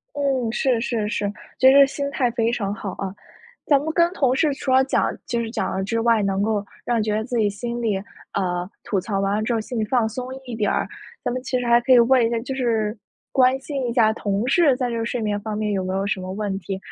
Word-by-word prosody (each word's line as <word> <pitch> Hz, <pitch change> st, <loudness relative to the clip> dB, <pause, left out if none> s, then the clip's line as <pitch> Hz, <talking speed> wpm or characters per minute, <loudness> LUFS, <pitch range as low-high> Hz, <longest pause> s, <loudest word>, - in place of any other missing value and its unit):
嗯， 270 Hz, -5 st, 0 dB
是， 250 Hz, 0 st, +1 dB
是， 225 Hz, -3 st, -1 dB
是， 205 Hz, -1 st, -1 dB, 0.3 s
就 260 Hz, -, +7 dB
是 275 Hz, +1 st, +8 dB
心 280 Hz, +1 st, -3 dB
态 255 Hz, -4 st, +1 dB
非 230 Hz, -1 st, +1 dB
常 200 Hz, -4 st, -2 dB
好 205 Hz, -2 st, -5 dB
啊， 195 Hz, -1 st, -4 dB, 0.5 s
咱 285 Hz, -2 st, +4 dB
们 310 Hz, +3 st, -3 dB
跟 340 Hz, +1 st, +3 dB
同 265 Hz, -8 st, +2 dB
事 300 Hz, 0 st, +2 dB
除 270 Hz, -, -4 dB
了 260 Hz, +1 st, +5 dB
讲 265 Hz, -, +1 dB, 0.2 s
就 235 Hz, -, -1 dB
是 230 Hz, -1 st, -3 dB
讲 225 Hz, -1 st, -2 dB
了 190 Hz, -, -1 dB
之 230 Hz, +4 st, -1 dB
外， 230 Hz, -2 st, +3 dB
能 195 Hz, 0 st, 0 dB
够 210 Hz, -1 st, 0 dB, 0.2 s
让 240 Hz, -1 st, +1 dB
你 -, -, +1 dB
觉 215 Hz, 0 st, 0 dB
得 220 Hz, -, -1 dB
自 245 Hz, 0 st, -2 dB
己 215 Hz, -2 st, +3 dB
心 235 Hz, +4 st, -4 dB
里 220 Hz, -4 st, 0 dB, 0.4 s
呃， 180 Hz, -2 st, -1 dB, 0.2 s
吐 195 Hz, -, 0 dB
槽 195 Hz, +1 st, -2 dB
完 195 Hz, +1 st, +1 dB
了 215 Hz, -, -1 dB
之 235 Hz, +2 st, 0 dB
后 225 Hz, -, 0 dB
心 235 Hz, +2 st, -5 dB
里 220 Hz, -, +1 dB
放 235 Hz, +1 st, +1 dB
松 250 Hz, +3 st, -5 dB, 0.2 s
一 245 Hz, -2 st, -6 dB
点 210 Hz, -3 st, 0 dB
儿。 -, -, 0 dB, 0.4 s
咱 -, -, 0 dB
们 255 Hz, +1 st, -3 dB
其 255 Hz, 0 st, -1 dB
实 245 Hz, -, -3 dB
还 235 Hz, 0 st, +5 dB
可 240 Hz, +2 st, +2 dB
以 250 Hz, -, +8 dB
问 240 Hz, 0 st, +5 dB
一 -, -, +1 dB
下 235 Hz, -, 0 dB
就 260 Hz, +3 st, -5 dB
是 225 Hz, -4 st, 0 dB, 0.3 s
关 260 Hz, 0 st, +4 dB
心 270 Hz, -2 st, -3 dB
一 -, -, -1 dB
下 220 Hz, -3 st, +4 dB
同 205 Hz, 0 st, -2 dB
事 280 Hz, -1 st, +4 dB
在 250 Hz, -1 st, -1 dB
这 230 Hz, -1 st, -2 dB
睡 240 Hz, +1 st, -2 dB
眠 205 Hz, -1 st, -1 dB
方 215 Hz, 0 st, -4 dB
面 210 Hz, -1 st, -1 dB
有 195 Hz, -2 st, 0 dB
没 185 Hz, 0 st, -3 dB
有 195 Hz, +1 st, -1 dB
什 205 Hz, -1 st, -1 dB
么 185 Hz, 0 st, -6 dB
问 200 Hz, -1 st, -2 dB
题， 195 Hz, 0 st, -5 dB
230 Hz, 285 characters per minute, -22 LUFS, 210-255 Hz, 0.5 s, 是